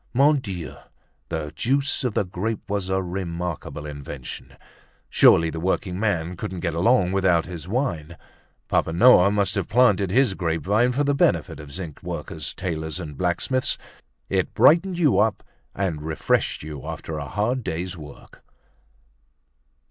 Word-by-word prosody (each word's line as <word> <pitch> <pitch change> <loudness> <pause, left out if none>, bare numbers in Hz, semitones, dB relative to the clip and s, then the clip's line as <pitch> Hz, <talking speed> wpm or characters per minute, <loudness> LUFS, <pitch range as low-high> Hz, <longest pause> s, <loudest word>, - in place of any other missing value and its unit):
Mon 145 +3 +5
Dieu! 95 -9 -6 0.5
the 80 -3 -3
juice 140 +3 0
of 125 -4 -1
the - - +2
grape 105 +4 -4
was 100 -2 -2
a 95 0 0
remarkable 85 -4 -4
invention. 70 -3 -8 0.5
Surely 80 0 +5
the 80 - -5
workingman 90 -1 -1
couldn't 90 +1 -5
get 85 -3 -1
along 95 +2 +3
without 95 -4 +2
his 90 -3 -8
wine. 90 - -2 0.5
Papa 80 - +1
Noah 100 -1 +7
must 100 -2 +1
have 100 -2 -2
planted 105 -4 +4
his 120 +1 +3
grapevine 95 - +1
for 140 +4 0
the 145 0 +2
benefit 140 - +1
of 75 -2 -10
zinc 85 -3 -7
workers, - - -5
tailors 80 -2 -3
and 75 -5 -7
blacksmiths. 95 - 0 0.5
It - - -1
brightened 175 +3 +5
you 145 - +3
up 105 -1 +1 0.3
and 90 -6 -2
refreshed 80 -1 0
you 75 -3 -7
after 80 -1 -5
a 70 - -5
hard 115 - -1
day's 90 +2 -3
work. 75 -4 -13
95 Hz, 145 wpm, -24 LUFS, 80-110 Hz, 0.5 s, Noah